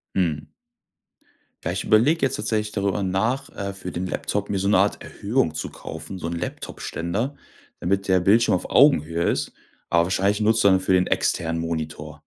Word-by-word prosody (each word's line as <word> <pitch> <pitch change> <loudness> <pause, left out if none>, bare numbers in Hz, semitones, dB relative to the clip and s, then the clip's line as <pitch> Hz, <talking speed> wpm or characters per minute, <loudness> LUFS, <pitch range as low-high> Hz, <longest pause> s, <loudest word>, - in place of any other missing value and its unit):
Mhm. 80 -6 0 1.2
Ja, 85 - -1
ich 90 0 -2
überleg 135 +10 +3
jetzt 135 - +1
tatsächlich 105 0 -1
darüber 100 -1 -1
nach, 110 +9 -1
äh, 100 0 -5
für 95 -2 -7
den 90 +3 -3
Laptop 100 +2 -2
mir 100 - 0
so 95 - -1
'ne 105 - +4
Art 100 +2 +1
Erhöhung 105 - -1
zu 80 - -3
kaufen, 80 +4 -8
so 85 - -4
'n 85 - -3
Laptopständer, 90 +7 -4 0.4
damit 100 +2 -1
der 95 -1 +4
Bildschirm 105 +6 +4
auf 90 - -4
Augenhöhe 85 - +4
ist, - - -1 0.4
aber 85 0 +4
wahrscheinlich 95 +3 +1
nutzt 110 +1 +3
du - - +6
dafür 95 0 +3
den 90 0 +3
externen 80 0 0
Monitor. 75 -2 -5
95 Hz, 175 wpm, -23 LUFS, 85-105 Hz, 1.2 s, du